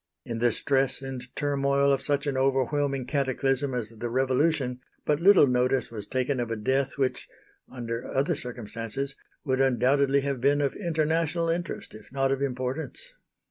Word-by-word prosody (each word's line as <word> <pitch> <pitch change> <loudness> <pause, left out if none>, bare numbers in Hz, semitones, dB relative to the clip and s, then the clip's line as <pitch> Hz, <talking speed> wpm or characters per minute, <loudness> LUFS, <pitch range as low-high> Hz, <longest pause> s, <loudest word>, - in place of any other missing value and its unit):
In 115 -1 -4
the 120 0 +3
stress 135 +3 +1
and 130 -2 -6
turmoil 140 -1 +2
of 135 - 0
such 145 +1 0
an 140 -2 -1
overwhelming 135 0 +1
cataclysm 135 -1 0
as 115 -4 -2
the 115 +1 -5
Revolution, 130 +1 +1 0.3
but 150 -1 +2
little 190 -2 +7
notice 125 0 +1
was 105 -3 -7
taken 130 +2 -1
of 120 -1 -2
a 115 - -1
death 130 +6 0
which, 135 -2 -1 0.4
under 115 -2 -5
other 145 +6 +1
circumstances, 120 +2 -4 0.3
would 130 -1 +1
undoubtedly 135 +2 +3
have 140 -3 -2
been 140 +2 +3
of 140 -2 +1
international 165 -1 0
interest 170 +1 -3
if 110 - -13
not 135 0 +1
of 135 0 0
importance. 135 - -3
135 Hz, 160 wpm, -27 LUFS, 125-145 Hz, 0.4 s, little